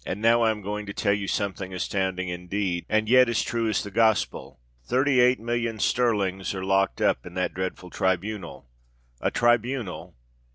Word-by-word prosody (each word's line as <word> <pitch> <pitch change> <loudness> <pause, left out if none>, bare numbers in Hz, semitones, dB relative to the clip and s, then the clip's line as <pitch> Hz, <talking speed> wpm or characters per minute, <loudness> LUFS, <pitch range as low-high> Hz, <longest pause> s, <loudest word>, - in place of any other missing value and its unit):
now 115 +3 +3
I 115 - +4
am 105 -2 -3
going 105 +1 -4
to 100 - -6
tell 100 -2 +1
you 100 -1 -2
something 95 -1 -2
astounding 95 0 -2
indeed—and 90 +3 -2
yet 130 +1 +6
as 115 - +1
true 115 -1 -1
as 110 - 0
the 100 - -8
Gospel! 110 - +1 0.2
Thirty 130 - +2
eight 125 +1 +4
millions 115 -1 -1
sterling 105 -6 +1
are 95 - -4
locked 95 0 +1
up - - +2
in 90 - -11
that 90 - -1
dreadful 95 -1 -5
tribunal. 95 -5 -2 0.5
A - - 0
tribunal! 120 -7 0
105 Hz, 165 wpm, -25 LUFS, 95-115 Hz, 0.5 s, yet